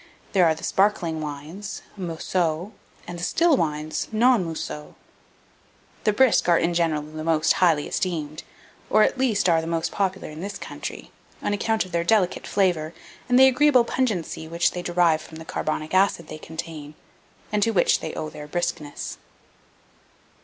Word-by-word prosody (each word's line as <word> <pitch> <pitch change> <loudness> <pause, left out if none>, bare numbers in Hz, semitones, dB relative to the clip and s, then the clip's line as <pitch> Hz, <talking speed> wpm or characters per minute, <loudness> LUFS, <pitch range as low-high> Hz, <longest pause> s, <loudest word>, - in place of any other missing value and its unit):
There 185 -3 +5
are 160 - +2
the 160 - -12
sparkling 180 -5 +1
wines 155 +7 -6
(mousseux), 175 0 -2 0.4
and 175 0 -6
the - - -6
still 335 - +3
wines 155 - -2
(non 235 -1 +4
mousseux). 155 -2 -6 1.1
The 210 - +5
brisk 255 -5 +4
are 170 - +6
in 170 +1 +1
general 165 -3 +1
the 155 +1 -7
most 160 -1 +3
highly 160 -5 +3
esteemed, 155 -4 -3 0.5
or, 215 - +5
at 255 - +1
least, 220 -7 +2
are 165 -2 +4
the 160 - -6
most 165 -1 -1
popular 190 -1 -1
in 155 +2 -8
this 200 +1 -5
country, - - -7 0.3
on - - 0
account 220 +1 0
of 185 - -13
their 170 -1 0
delicate 190 -1 +1
flavour 175 -5 0 0.3
and 245 - +5
the 265 - +9
agreeable 265 -1 +5
pungency 210 -10 -2
which 170 +1 +1
they 180 - -5
derive 175 -2 +2
from 160 - -11
the 160 - -9
carbonic 155 +1 -3
acid 185 -4 +2
they 155 - -7
contain, 155 -2 -7 0.6
and 210 0 +1
to 230 - +3
which 195 -6 +3
they - - -6
owe 155 -1 -4
their 150 -1 -9
briskness. 150 -3 -4
170 Hz, 165 wpm, -24 LUFS, 155-200 Hz, 1.1 s, the